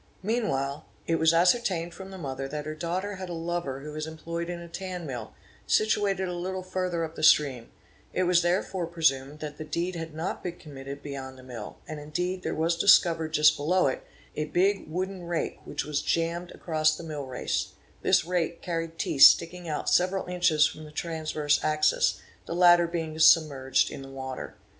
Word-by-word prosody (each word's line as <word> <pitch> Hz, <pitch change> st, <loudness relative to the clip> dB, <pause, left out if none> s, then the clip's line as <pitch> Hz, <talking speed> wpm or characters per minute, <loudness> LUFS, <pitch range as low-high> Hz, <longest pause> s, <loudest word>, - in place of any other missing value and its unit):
Meanwhile, 150 Hz, -, -1 dB, 0.2 s
it 165 Hz, -, +1 dB
was 160 Hz, 0 st, +5 dB
ascertained 175 Hz, -1 st, +2 dB
from 190 Hz, +2 st, -9 dB
the 190 Hz, -, -9 dB
mother 135 Hz, -4 st, -4 dB
that 150 Hz, +1 st, -5 dB
her 155 Hz, -, -4 dB
daughter 180 Hz, +5 st, -3 dB
had 185 Hz, -1 st, -6 dB
a -, -, -4 dB
lover 165 Hz, -5 st, -3 dB
who 150 Hz, +2 st, -7 dB
was 155 Hz, +1 st, -4 dB
employed 170 Hz, +2 st, -5 dB
in 175 Hz, -1 st, -4 dB
a 170 Hz, -, -9 dB
tan 180 Hz, 0 st, -6 dB
mill, 125 Hz, -6 st, -6 dB, 0.3 s
situated 200 Hz, -3 st, +2 dB
a 180 Hz, -, -3 dB
little 185 Hz, +2 st, -4 dB
further 185 Hz, -2 st, -2 dB
up 160 Hz, 0 st, -5 dB
the 165 Hz, -, -8 dB
stream; 140 Hz, -6 st, +4 dB, 0.4 s
it 185 Hz, -, 0 dB
was 175 Hz, -1 st, +4 dB
therefore 180 Hz, 0 st, 0 dB
presumed 150 Hz, -4 st, 0 dB
that 150 Hz, 0 st, -6 dB
the -, -, -4 dB
deed 170 Hz, +4 st, -2 dB
had 165 Hz, -2 st, -6 dB
not 165 Hz, +4 st, -3 dB
been 175 Hz, -1 st, -5 dB
committed 140 Hz, -1 st, -9 dB
beyond 135 Hz, -2 st, -7 dB
the 130 Hz, -, -14 dB
mill; 120 Hz, -4 st, -8 dB
and 155 Hz, -1 st, -6 dB
indeed 180 Hz, +5 st, -3 dB
there -, -, -3 dB
was 165 Hz, +2 st, +1 dB
discovered 165 Hz, -4 st, +4 dB
just 150 Hz, -1 st, +5 dB
below 180 Hz, +6 st, +2 dB
it, 130 Hz, -, 0 dB, 0.3 s
a 150 Hz, -, -1 dB
big 185 Hz, +3 st, +1 dB
wooden 185 Hz, +1 st, -4 dB
rake 170 Hz, -1 st, -2 dB
which 145 Hz, -, -4 dB
was 150 Hz, -1 st, -1 dB
jammed 170 Hz, +1 st, -1 dB
across 155 Hz, -2 st, 0 dB
the -, -, -8 dB
mill 150 Hz, -4 st, -5 dB
race; 130 Hz, -1 st, -2 dB, 0.3 s
this -, -, +3 dB
rake 170 Hz, -1 st, -1 dB
carried 165 Hz, -1 st, -3 dB
teeth 140 Hz, -, -2 dB
sticking 170 Hz, +2 st, +6 dB
out 150 Hz, -, -3 dB
several 185 Hz, +2 st, +2 dB
inches 175 Hz, -4 st, +3 dB
from 155 Hz, -, -4 dB
the 150 Hz, -, -11 dB
transverse 155 Hz, -2 st, -1 dB
axis, 155 Hz, 0 st, +2 dB, 0.3 s
the 170 Hz, -, -3 dB
latter 175 Hz, -1 st, +6 dB
being 160 Hz, -2 st, -4 dB
submerged 145 Hz, -5 st, +4 dB
in -, -, -7 dB
the 135 Hz, -, -10 dB
water. 130 Hz, -1 st, -7 dB
165 Hz, 190 wpm, -27 LUFS, 150-180 Hz, 0.4 s, sticking